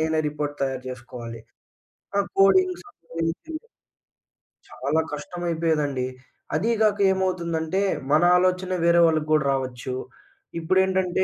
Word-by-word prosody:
నేనే 160 0 +1
రిపోర్ట్ 145 0 -4
తయారు 135 -1 -2
జేసుకోవాలి. 120 -2 -8 0.8
ఆ! - - +3 0.2
Coding 365 - +5
some 410 - -19 0.2
reasoning. 305 - -3 1.1
చాలా 145 +4 -1
కష్టమయిపోయేదండి. 160 -4 -1 0.5
అదీ 220 +9 +1
గాక 210 -2 +3
ఏమవుతుందంటే, 180 -2 -1 0.3
మన 155 +2 +5 0.2
ఆలోచన 185 0 +1
వేరే 170 0 +5
వాళ్ళకు 155 -2 +1
గూడా 155 -2 +3
రావచ్చు. 130 -1 -3 0.7
ఇప్పుడేంటంటే, 185 +1 +2
165 Hz, 105 wpm, -24 LUFS, 145-185 Hz, 1.1 s, Coding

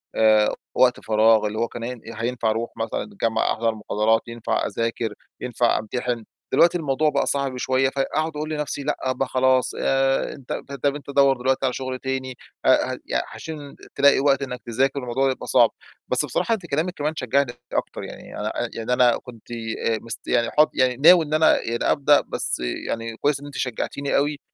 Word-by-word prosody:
آآ، 110 -1 +4 0.2
وقت 125 -1 +4
فراغ 110 0 +4
اللي 105 +1 -5
هو 115 - +1
كان 115 0 -8
هين 125 -1 -5
آآ، 115 - -7
هينفع 120 -2 0
أرُوح 115 +2 -2
مثلًا 115 0 -2
الجامعة 195 - -1
أحضر 115 -1 -1
مُحاضرات 110 +1 +1
ينفع 115 -1 -2
أذاكر، 115 -1 -2 0.3
ينفع 125 -1 +1
أمتحِن، 120 +2 -3 0.3
دلوقتي 175 +1 +5
الموضوع 150 -1 +1
بقى - - 0
صعب 140 -2 -1
شوية، 130 +1 +1
فأقعُد 150 +4 -1
أقول 155 +1 -3
لنَفْسي 150 -2 -3
لأ، 135 -3 -1
ب 130 +1 -1
خلاص 130 0 +2
آآ، 135 0 +1
أنت 135 -4 -7
به 140 - -7
طَب 140 0 0
أنت 140 -2 -9
دوّر 140 -1 +4
دلوقتي 130 +2 0
على 125 - 0
شُغل 130 0 -4
تاني 130 -1 -3 0.3
أ - - +5 0.2
هق - - -5
يع - - 0
عشان 150 -3 -8 0.2
تلاقي 140 0 +5
وقت 140 0 +3
إنّك 125 -3 -5
تذاكر 135 +4 0
والموضوع 130 +1 0
يبقى 130 - -7
صعب، - - +5 0.4
بس - - +1
بصراحة 230 - 0
أنتِ 195 -6 -3
كلامِك 165 +4 -1
كمان 150 0 -2
شجّعني 135 -1 +1 0.2
أكتر - - -2
يعني - - -9
أنا - - -2 0.2
آآ، - - -6
يعني 115 +2 -2
أنا 125 -1 +4
كنت 120 -3 -13
ي 115 -1 -4 0.2
آآ، - - -4
مست 115 -1 -8
يعني 120 -1 +1
حاط 150 +1 +4
يعني 125 -1 +2
ناوي 165 +3 +7
إن 150 - -5
أنا 155 0 +4
يعني 115 +1 -2
أبدأ 145 0 +4
بس - - -2
يعني 115 - -4
كويس 145 +1 +1
إن 145 - -11
أنتِ 145 -1 -8
شجّعتيني 135 +3 -2
أوي 145 +1 0
130 Hz, 200 wpm, -23 LUFS, 115-140 Hz, 0.4 s, ناوي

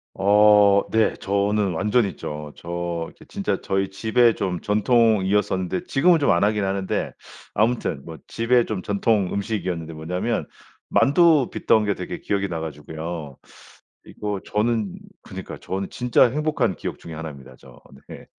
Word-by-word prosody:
어 100 0 +5
네. 110 0 +3
저는 100 -1 0
완전 105 +6 +2
있죠. 75 -3 -7
저 85 -1 -4
지 - - -17
진짜 - - -2
저희 95 0 -1
집의 115 +3 +3
좀 90 -3 -2
전통이었었는데 105 - +1
지금은 170 +2 +3
좀 140 - +3
안 85 +3 +2
하긴 105 0 +1
하는데. 95 0 -2 0.4
아무튼 110 - 0
뭐 80 -1 -8
집에 120 +1 +2
좀 105 -4 -4
전통 100 -1 +1
음식이었는데 95 -6 -3
뭐냐면 90 +9 -3 0.4
만두 155 -1 +4
빚던 110 -1 +2
게 100 - +1
되게 90 - -6
기억이 100 -1 -1
나 85 -3 -4
가지고요. 80 -1 -6 0.7
이거 105 -2 -4
저는 105 -2 -1 0.3
그니까요 - - -8
저는 95 +1 -4
진짜 125 0 +3
행복한 150 +2 0
기억 - - -6
중에 80 - -9
1 80 0 -6
입니다. 65 -2 -13
저 - - -16 0.3
네. - - -11
100 Hz, 295 characters per minute, -23 LUFS, 85-110 Hz, 0.7 s, 어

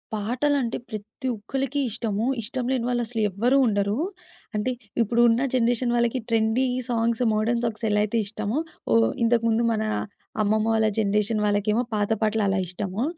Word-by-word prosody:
పాటలంటే 245 +4 0
ప్రతి 215 +4 -6
ఒక్కళ్ళకి 270 +6 -3
ఇష్టము. 220 -1 -2 0.2
ఇష్టం 245 +3 -2
లేని 250 -3 0
వాళ్ళు 245 -1 +1
అసలు 225 -1 -2
ఎవ్వరూ 235 +8 +2
ఉండరు. 205 0 0 0.6
అంటే 210 +5 0 0.3
ఇప్పుడు 230 +2 +2
ఉన్న 230 +2 +2
జనరేషన్ 240 0 +2
వాళ్ళకి 240 +1 +1
ట్రెండీ 225 +3 +2 0.2
సాంగ్స్ 230 0 0
మోడర్న్ 230 +2 +1
సాక్స్ 225 0 -2
ఎలైయితే 210 +2 +1
ఇష్టమో 215 +3 -2 0.4
ఓహ్! 115 0 +5 0.2
ఇంతకుముందు 230 0 +2
మన 220 -1 0 0.6
అమ్మమ్మ 215 +1 +1
వాళ్ళ 220 -1 +3
జనరేషన్ 210 +1 +1
వాళ్ళకేమో 210 +2 +1
పాత 205 0 0
పాటలు 215 0 +1
అలా 195 0 +1
ఇష్టము. 190 +4 -3
225 Hz, 145 wpm, -25 LUFS, 210-240 Hz, 0.6 s, ఓహ్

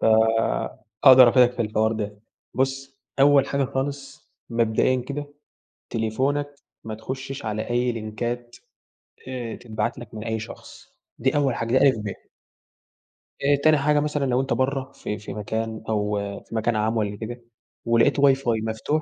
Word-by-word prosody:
ف - - -2 1.0
أقدَر 130 -2 +10
أفيدك 125 0 +5
في 120 - -1
الحوار 110 +1 +1
ده. 105 -1 -4 0.4
بُص 135 +1 -2 0.2
أول 140 -1 +6
حاجة 140 -1 0
خالص، 140 +2 -5 0.2
مبدئيًا 115 +2 +2
كده 145 +1 -4 0.6
تليفونك 140 +6 -1 0.3
ما 110 -1 -5
تخشّش 130 +3 -6
على 110 +2 -3
أي 120 0 +1
لينكات 120 +2 -4 0.7
آآ 125 -3 -5
تتبعت 110 0 -3
لك 120 -3 -11
من 105 0 -6
أي 110 -1 -2
شخص، 110 +2 -11 0.3
دي 130 +2 +1
أول 135 -4 +2
حاجة. 115 +3 +1
دي 140 - +6
أ، - - +5
ب. 100 -2 -7 1.2
آآ 145 +1 +4
تاني 155 -1 +6
حاجة، 150 +1 +2
مثلًا 150 -1 -1
لو 130 0 +2
أنت 135 - -1
برَّه 135 0 -1
في 105 - -5
في 105 - -8
مكان 110 +1 -4
أو 105 -1 0 0.3
في 115 - -9
مكان 110 +1 +1
عام 110 +2 0
والّا 105 -1 -1
كده، 120 +3 -6 0.4
ولقيت 115 +5 +3
واي 140 -1 +6
فاي 120 -5 -1
مفتوح 110 +8 -1
120 Hz, 160 wpm, -24 LUFS, 110-135 Hz, 1.2 s, أقدَر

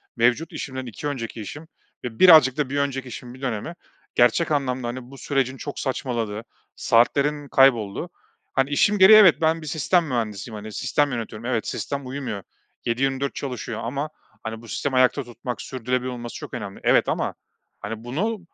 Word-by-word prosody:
mevcut 125 +7 +2
işimden 130 -4 -5
2 125 +5 -6
önceki 115 -5 -4
işim 145 +10 -8 0.4
ve 115 -2 -6
birazcık 155 -8 +8
da 145 -3 0
bir 140 - -2
önceki 135 -2 -2
işin 120 +1 -8
bir 130 - -14
dönemi 125 +4 -3 0.4
gerçek 125 +8 +3
anlamda, 130 -4 0
hani, 120 +1 -6
bu 135 - -11
sürecin 135 -2 -1
çok 145 +2 -6
saçmaladığı, 115 -5 -2 0.3
saatlerin 145 +5 +2
kaybolduğu. 120 -8 +3 0.4
Hani, 135 +1 +1
işim 205 +8 +3
gereği 205 +3 +9
evet, 190 -6 +8
ben 160 0 +2
bir 155 - -8
sistem 165 +4 +2
mühendisiyim, 110 -3 -3
hani, 105 +1 -8
sistem 145 +5 +1
yönetiyorum. 115 -1 -5
Evet, 120 -3 -1
sistem 140 -2 -4
uyumuyor, 125 -7 -5 0.4
7-24 135 +3 0
çalışıyor 125 -4 -5
ama 140 +6 -3 0.3
hani, 110 0 -5
bu 115 - -13
sistemi 130 +5 -2
ayakta 130 +2 +3
tutmak, 120 +1 -6
sürdürülebilir 125 0 -2
olması 120 -1 -7
çok - - -8
önemli 105 -4 -6
evet - - +4
ama - - -1 0.4
hani, 110 +2 -6
bunu 195 - -2
130 Hz, 170 wpm, -24 LUFS, 115-145 Hz, 0.4 s, gereği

